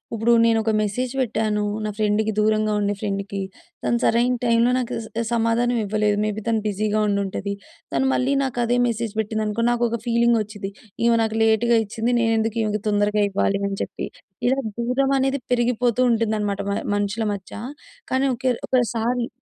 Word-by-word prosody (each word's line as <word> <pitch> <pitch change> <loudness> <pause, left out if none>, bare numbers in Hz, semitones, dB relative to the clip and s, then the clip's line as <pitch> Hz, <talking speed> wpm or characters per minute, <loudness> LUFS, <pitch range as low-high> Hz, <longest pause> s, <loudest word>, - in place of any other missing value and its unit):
ఉప్పుడు 230 +2 +3
నేనొక 225 -1 +3
మెసేజ్ 245 +5 -2
పెట్టాను. 215 -4 0 0.2
నా 215 - -1
ఫ్రెండ్‌కి, 215 0 +1
దూరంగా 215 0 +2
ఉండే 205 0 0
ఫ్రెండ్‌‌‌‌కి. 200 -1 -3 0.4
తను 235 - +2
సరైన 240 +2 +3
టైమ్‌లో 235 +1 +3
నాకు 250 -1 -2
స - - -10 0.3
సమాధానం 235 +1 +1
ఇవ్వలేదు. 210 0 +1
మేబీ 215 0 -2
తను 225 -2 +1
బిజీగా 210 +1 0
ఉండుంటది. 200 0 -1 0.4
తను 265 - +1
మళ్ళీ 265 +2 +1
నాకదే 245 -2 0
మెసేజ్ 230 -2 -2
పెట్టిందనుకో, 215 +1 -1
నాకొక 235 -1 0
ఫీలింగొచ్చిద్ది. 225 -4 +1 0.3
ఈమె 235 -1 +4
నాకు 220 0 -2
లేటుగా 225 +1 +3
ఇచ్చింది, 225 +4 -1
నేనెందుకు 225 0 +1
ఈమెకు 210 -1 -1
తొందరగా 205 0 +2
ఇవ్వాలి 200 0 0
అని 195 0 -4
చెప్పి. - - -5 0.4
ఇలా 260 +2 +2 0.2
దూరమనేది 270 +2 +1
పెరిగిపోతూ 245 0 +1
ఉంటుందనమాట 215 -3 0
మ - - 0 0.2
మనుషుల 205 +2 -1
మధ్యా, 200 +2 -8 0.5
కానీ 260 +1 +2
ఒకేల్ 250 0 -1
ఒకసారి 240 0 0
225 Hz, 145 wpm, -22 LUFS, 210-240 Hz, 0.5 s, ఈమె